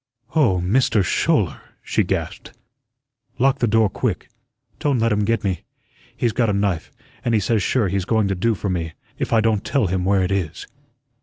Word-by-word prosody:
"Oh, 120 - +3
MISTER 105 +3 +2
Schouler," - - +1 0.2
she - - +1
gasped, - - -4 0.8
"lock 135 +2 +2
the 120 - +2
door 110 0 +4
quick. 100 - -3 0.5
Don't 145 -3 +1
let 115 0 +1
him 105 0 +1
get 115 +1 0
me. 95 -4 -1 0.6
He's 120 - +1
got 115 -3 +1
a - - +1
knife, 100 -4 -1 0.3
and 120 -2 +1
he - - +4
says 105 +2 +1
sure 110 +3 +1
he's 95 0 -1
going 110 -1 +2
to 100 - 0
do 110 +5 +1
for 100 - -4
me, 85 -4 -2 0.3
if - - -2
I 115 - +4
don't 110 -2 +1
tell 140 -5 +1
him 95 0 -1
where 95 0 +2
it 90 - -1
is." 95 -6 -2
105 Hz, 190 wpm, -21 LUFS, 95-115 Hz, 0.8 s, door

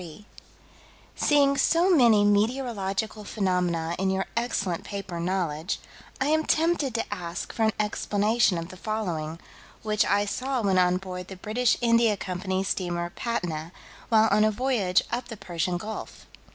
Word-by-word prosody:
28, 175 +4 -11 0.9
1883: - - -1
"Seeing 280 -2 +4
so 350 +2 +4
many 230 -7 +5
meteorological 215 -1 0
phenomena 180 -5 -1
in 190 0 +1
your 190 0 0
excellent 205 -7 -1
paper, 195 -4 -6
Knowledge, 170 -2 -1 0.4
I 265 - +1
am 315 +1 +3
tempted 315 -6 +1
to 225 -2 -2
ask 175 -3 -5
for 225 - +1
an 220 - +2
explanation 210 -1 +1
of 165 +1 -5
the 185 - -11
following, 175 -7 -3 0.4
which 215 -1 +2
I 205 0 +2
saw 255 +4 -2
when 190 -2 +3
on 180 0 +3
board 180 -1 -7
the 190 - -8
British 225 +6 +1
India 230 -3 +3
Company's 190 +1 -2
steamer 175 -2 -2
Patna, 170 -9 -3 0.4
while 220 -1 +5
on 210 +1 +4
a 215 - +4
voyage 215 -5 +1
up 245 +1 -2
the 225 - -8
Persian 175 -2 -2
Gulf. 215 +5 -7
205 Hz, 155 wpm, -26 LUFS, 180-230 Hz, 0.9 s, many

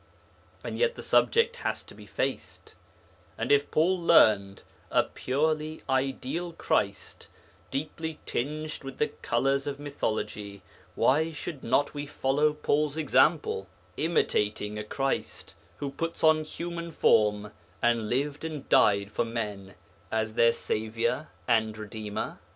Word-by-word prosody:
And - - -5
yet 480 0 +2
the - - -8
subject 470 +1 +3
has - - -2
to - - -14
be - - -13
faced, - - -4 0.6
and - - -1
if 145 0 +4
Paul 180 +4 +2
'learned' 105 -12 +4 0.3
a - - +4
purely 155 +3 -1
ideal 135 +6 -1
Christ, 100 -10 -1 0.4
deeply 155 +3 -4
tinged 155 +4 -3
with 135 -1 -7
the 150 - +1
colours 135 +4 0
of 140 -1 -4
mythology, 105 -8 -3 0.3
why 160 +5 +3
should 150 -2 -7
not 135 +4 +2
we 145 0 -5
follow 145 +2 +1
Paul's 150 0 0
example, 150 - +2 0.3
imitating 105 -9 0
a - - -3
Christ 135 +5 -3 0.2
who 140 -1 -4
put 165 +4 -4
on 155 -1 +5
human 170 +1 -5
form, 105 -6 +3 0.3
and 115 -2 +1
lived 140 +4 -1
and 155 -4 -5
died 100 0 +4
for - - 0
men 105 -4 -5 0.4
as 110 0 -1
their 115 +1 +5
Saviour 115 +8 -2 0.2
and 110 -3 +2
Redeemer? 110 -1 -5
135 Hz, 130 wpm, -28 LUFS, 110-155 Hz, 0.6 s, on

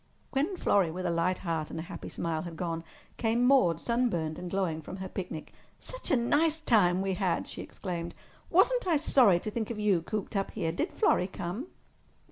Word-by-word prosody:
When 305 +8 0
Florrie, 195 - +3
with 180 +3 -4
a 175 - +1
light 170 +2 +1
heart 160 -2 -1
and - - -6
a - - -4
happy - - -8
smile, 165 -2 -2
had 170 -2 -7
gone, 165 -1 -3 0.3
came 235 +1 +2
Maude, 185 - +4
sunburned 200 -11 0
and 180 - -5
glowing 175 -4 -1
from 170 - -8
her 190 0 -5
picnic. 180 -4 -6 0.2
"Such - - -8
a - - +4
nice 300 +7 +2
time 205 - +4
as 190 - 0
we 195 -1 0
had!" 185 -2 0
she - - -7
exclaimed. 170 -3 -5 0.3
"Wasn't - - +3
I 340 - +4
sorry 245 - +5
to 215 - -4
think 220 -1 -3
of 235 - -4
you 205 -5 +2
cooped 210 +4 -4
up 195 0 0
here! 170 -7 -2
Did 305 - -2
Florrie 410 - +2
come?" 195 - -5
190 Hz, 205 wpm, -30 LUFS, 170-240 Hz, 0.3 s, sorry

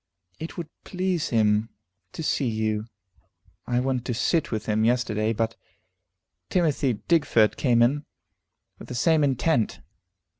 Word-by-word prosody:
"It 160 - -7
would 170 -3 -4 0.2
please 180 -3 -1
him 110 -1 +2 0.4
to 160 - -5
see 140 -3 0
you. 110 0 -1 0.8
I 120 0 +1
went 130 -1 -1
to 120 - -2
sit 155 +6 +1
with 110 -2 -2
him 110 0 +1
yesterday, 115 -2 +1
but 115 0 -1 0.9
Timothy 150 -7 +1
Digfort 145 -10 +3
came 120 -3 +3
in, 145 +5 +1 0.7
with - - -10
the 125 - -6
same 155 +4 +3
intent. 130 -3 +1
125 Hz, 135 wpm, -25 LUFS, 110-155 Hz, 0.9 s, Digfort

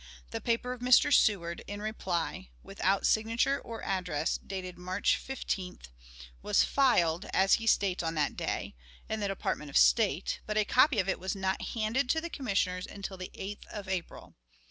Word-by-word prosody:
The - - -4
paper 240 +1 0
of 250 - -11
Mr. 250 +3 +5
Seward, 170 -5 +2
in 205 0 -5
reply, 190 -3 -3
without 195 0 0
signature 230 +5 +2
or 225 -2 -8
address, 180 -5 -1
dated 185 -2 -6
March 185 +3 0
15th, 185 - -5 0.5
was - - +3
"filed," 190 -10 +2
as 190 +1 +4
he 225 - -4
states, 195 -4 +2
on 165 -1 -2
that 150 -1 0
day, - - -3 0.3
in 220 - -2
the 205 - -1
Department 195 -6 -3
of - - +1
State, - - +3
but 215 0 -1
a 215 - +3
copy 255 +3 +4
of 190 -2 +1
it 190 - 0
was 190 +2 -3
not 190 -1 -1
handed 230 +4 0
to 320 - +3
the 340 +1 -6
Commissioners 195 -8 -1
until 200 -1 -7
the 185 0 -7
8th 200 +2 -7
of 205 -2 -7
April. 185 -3 -5
195 Hz, 175 wpm, -30 LUFS, 180-225 Hz, 0.5 s, Mr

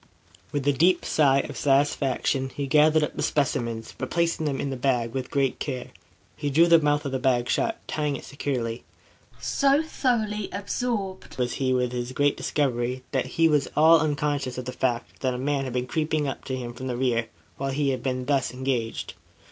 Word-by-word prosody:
With 145 -1 -2
a 145 - +5
deep 170 +7 +3
sigh 140 -3 +4
of - - -8
satisfaction, 135 -1 +1
he 140 - -2
gathered 155 +2 +4
up - - -3
the - - -3
specimens, 115 -6 -1
replacing 170 -2 0
them 135 -2 -1
in 140 - -2
his 130 - -5
bag 120 -3 +1
with 130 -1 -3
great 135 -2 0
care. 130 -4 -4 0.4
He 145 - -2
drew 160 +5 +5
the 170 -1 +6
mouth 145 -1 +1
of 140 - -2
the 130 - -1
bag 125 -2 +2
shut, 225 - 0
tying 150 -2 -1
it - - -8
securely. 125 -5 -3 0.6
So 280 +2 +2
thoroughly 220 -9 -1
absorbed 200 -1 -3
was 125 -1 0
he 130 -1 +2
with 125 -1 +1
his 125 0 -4
great 145 +1 +2
discovery, 125 -3 -1
that 130 -2 0
he 165 0 +6
was 150 -3 +2
all 160 +2 +7
unconscious 145 -4 -1
of 125 - -4
the 125 - -4
fact 120 -2 -2
that 130 -2 0
a - - -3
man 135 +1 -1
had 130 - -5
been 125 0 -1
creeping 155 +1 -1
up 135 - -5
to 130 - -2
him 120 -2 -5
from 130 +2 -6
the 125 -2 -2
rear 120 -3 +1 0.3
while 135 0 -2
he 140 +1 0
had 130 -2 -1
been 130 -1 -2
thus 135 -4 +1
engaged. 125 -3 -2
135 Hz, 200 wpm, -26 LUFS, 125-150 Hz, 0.6 s, all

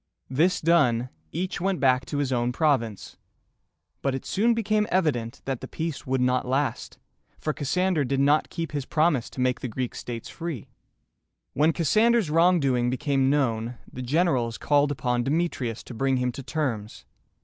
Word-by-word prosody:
This 170 +7 +2
done, 130 -8 +3 0.2
each 185 0 -3
went 190 -1 0
back 130 -1 +2
to 145 - -3
his 140 -2 0
own 120 0 +1
province; 125 - 0 0.8
but 135 -1 0
it 135 - -6
soon 230 +4 +2
became 215 -1 +1
evident 140 -11 0
that 135 -3 -3
the 130 - -6
peace 160 -2 -5
would 130 0 +1
not 125 0 +1
last, 135 +2 -1 0.4
for 155 - -2
Cassander 175 +3 0
did 135 +1 -1
not 145 +2 +3
keep 165 -1 -4
his 145 -3 -4
promise 155 -6 +1
to - - -10
make 125 0 +1
the - - -4
Greek 125 +2 -3
states 115 -2 -6
free. 165 -8 -6 0.8
When 155 +3 +3
Cassander's 215 +3 +2
wrongdoing 150 -8 +3
became 135 +1 +1
known, 120 -4 0 0.2
the 130 - -6
generals 130 -4 +1
called 145 -1 +2
upon 125 -3 0
Demetrius 135 -6 -1
to - - -10
bring 135 +3 +1
him 125 0 0
to 135 - -7
terms. 130 -7 -3
135 Hz, 165 wpm, -26 LUFS, 125-165 Hz, 0.8 s, done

